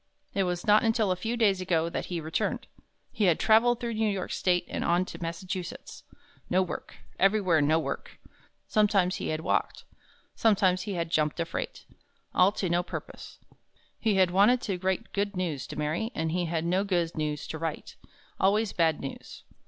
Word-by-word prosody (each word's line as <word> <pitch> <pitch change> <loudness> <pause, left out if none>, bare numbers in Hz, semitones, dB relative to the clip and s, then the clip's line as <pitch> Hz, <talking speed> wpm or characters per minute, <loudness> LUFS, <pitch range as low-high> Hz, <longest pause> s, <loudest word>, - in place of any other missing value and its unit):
It 195 -1 +1
was 180 -1 -2
not 210 0 +6
until 225 -3 +2
a - - +2
few 230 +6 -3
days 200 -5 +3
ago 170 -3 +1
that 170 - -4
he 175 -2 -3
returned. 160 0 -2 0.5
He 215 - 0
had 175 -4 +3
traveled 230 +2 +4
through 235 -1 -3
New 220 0 +1
York 195 -2 -3
State 180 -1 +1
and - - -3
on 175 +2 +2
to - - -9
Massachusetts. 175 +1 -5 0.5
No 185 +1 +3
work 180 - -7 0.2
everywhere 190 -4 +3
no 155 +2 +3
work! 150 -4 -5 0.5
Sometimes 200 -4 +2
he - - -4
had 155 0 -2
walked. - - -1 0.5
Sometimes 190 -4 +3
he 195 - -2
had 170 -1 -3
jumped 155 +1 +1
a 170 - +1
freight. 165 - -5 0.5
All 185 +2 +5
to 195 - -2
no 175 +1 +2
purpose. 180 - -8 0.6
He 220 -3 +1
had 185 -2 +4
wanted 205 +7 +5
to 195 -4 -3
write 190 +4 -2
good 200 0 -1
news 165 -8 -2
to - - -7
Mary, 155 +9 -1
and 160 0 -1
he 175 +1 0
had 165 0 -2
no 185 +3 +1
good 175 -4 0
news 150 -2 -2
to 160 - -5
write. 165 -1 -4 0.4
Always 205 +2 +2
bad 160 -3 +2
news. 135 - -8
185 Hz, 185 wpm, -28 LUFS, 165-205 Hz, 0.6 s, not